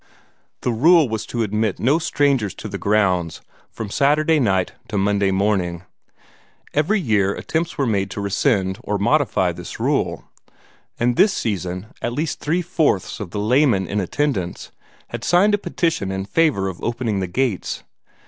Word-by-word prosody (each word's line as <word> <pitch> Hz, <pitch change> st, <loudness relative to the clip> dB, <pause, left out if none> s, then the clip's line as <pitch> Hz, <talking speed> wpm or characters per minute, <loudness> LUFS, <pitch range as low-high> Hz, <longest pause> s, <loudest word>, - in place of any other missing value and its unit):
The 125 Hz, -, 0 dB
rule 155 Hz, +6 st, +5 dB
was 110 Hz, -2 st, -4 dB
to 120 Hz, -1 st, -1 dB
admit 105 Hz, -1 st, -1 dB
no 140 Hz, +7 st, +3 dB
strangers 140 Hz, -, +1 dB
to -, -, -7 dB
the -, -, -6 dB
grounds 95 Hz, -5 st, +1 dB, 0.3 s
from 110 Hz, -3 st, -7 dB
Saturday 150 Hz, +4 st, +3 dB
night 95 Hz, -7 st, +1 dB, 0.2 s
to 105 Hz, -, -3 dB
Monday 100 Hz, 0 st, +2 dB
morning. 95 Hz, -3 st, 0 dB, 0.9 s
Every 170 Hz, +9 st, +2 dB
year 105 Hz, -, +1 dB
attempts 165 Hz, +1 st, -3 dB
were 140 Hz, -, +1 dB
made 100 Hz, -4 st, 0 dB
to -, -, -6 dB
rescind 100 Hz, -1 st, 0 dB
or 105 Hz, -, -1 dB
modify 100 Hz, -, +2 dB
this -, -, -8 dB
rule, -, -, 0 dB, 0.8 s
and 120 Hz, 0 st, +1 dB
this 200 Hz, -1 st, +5 dB
season 90 Hz, -, -3 dB, 0.2 s
at 120 Hz, -, -2 dB
least 155 Hz, +5 st, -2 dB
three 170 Hz, +4 st, 0 dB
fourths 160 Hz, -, 0 dB
of 105 Hz, -, -5 dB
the 105 Hz, -, -6 dB
laymen 115 Hz, -2 st, +3 dB
in 100 Hz, +3 st, -2 dB
attendance 100 Hz, -, -2 dB, 0.4 s
had -, -, -6 dB
signed 195 Hz, +4 st, +4 dB
a 205 Hz, -, +2 dB
petition 160 Hz, -, -1 dB
in 95 Hz, 0 st, -3 dB
favor 130 Hz, -6 st, +1 dB
of 95 Hz, -2 st, -6 dB
opening 115 Hz, -4 st, -1 dB
the 95 Hz, -, -2 dB
gates. 110 Hz, +2 st, -2 dB
110 Hz, 160 wpm, -21 LUFS, 95-145 Hz, 0.9 s, rule